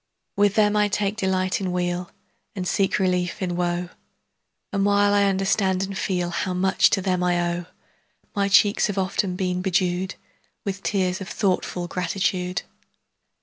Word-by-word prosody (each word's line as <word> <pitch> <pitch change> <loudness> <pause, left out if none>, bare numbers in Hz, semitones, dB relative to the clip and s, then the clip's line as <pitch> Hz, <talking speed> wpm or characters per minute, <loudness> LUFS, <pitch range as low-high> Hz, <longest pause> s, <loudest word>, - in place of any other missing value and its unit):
With 205 0 +3
them 210 -1 +3
I 210 0 +3
take 205 0 -1
delight 190 -2 0
in 185 -2 -2
weal 180 0 -2 0.5
And 185 -2 -3
seek 195 +1 +1
relief 180 -2 0
in 180 -3 -2
woe; 175 0 -1 0.8
And 200 -1 +1
while 205 0 +3
I 200 0 +4
understand 190 -1 +1
and 195 0 -4
feel 180 -3 -1
How 180 +1 -2
much 190 +1 +3
to 195 - 0
them 185 -2 0
I 180 -1 +2
owe, 175 0 0
10 - - -25 0.7
My 200 -1 +2
cheeks 205 +2 +4
have 205 -1 -4
often 190 0 0
been 180 -1 -1
bedew'd 185 0 0 0.5
With 195 -1 -3
tears 190 -2 0
of 190 - -6
thoughtful 180 -3 -1
gratitude. 180 0 -1
190 Hz, 160 wpm, -24 LUFS, 180-200 Hz, 0.8 s, I